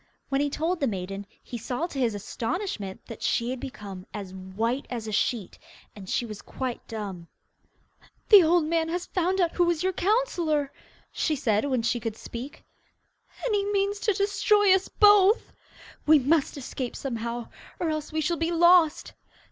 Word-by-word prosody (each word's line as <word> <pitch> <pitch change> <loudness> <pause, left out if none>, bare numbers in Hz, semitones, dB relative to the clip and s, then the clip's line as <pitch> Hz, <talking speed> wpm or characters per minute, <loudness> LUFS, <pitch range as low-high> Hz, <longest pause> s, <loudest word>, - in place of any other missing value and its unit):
When 275 0 +1
he 290 - +1
told 325 +5 -1
the 275 - +1
maiden, 195 -1 -4 0.2
he 240 - -6
saw 245 +7 -2
to 290 -6 -6
his 235 -5 +1
astonishment 220 - -4
that 230 - -9
she 235 +1 0
had 260 - -4
become 200 -8 -8
as 195 -3 -6
white 215 +8 -3
as 230 -3 -5
a - - -4
sheet, 210 -1 -1 0.4
and 195 -3 -10
she 240 - 0
was 215 -3 -8
quite 255 -2 -5
dumb. 195 -6 -6 1.0
'The 410 -3 +10
old 335 0 +3
man 325 0 0
has 355 +1 -2
found 370 +1 0
out 345 -2 +2
who 355 - +2
was 345 -1 +1
your 375 0 +1
counsellor,' 345 - +1 0.4
she 310 - 0
said 225 -5 +1
when 255 -4 0
she 240 +1 +1
could 225 -1 -4
speak, 260 +7 -8 0.8
'and - - 0
he 405 -1 +2
means 405 0 0
to 420 0 +1
destroy 405 0 +3
us 380 0 +2
both.' 415 +1 +5 0.5
We 310 0 +8
must 290 +2 +1
escape 255 -2 -5
somehow, 235 -2 -4 0.3
or 330 -2 0
else 310 -1 -4
we 315 0 -1
shall 335 +2 0
be 330 +2 -1
lost. 345 -2 +4
285 Hz, 175 wpm, -26 LUFS, 230-350 Hz, 1.0 s, The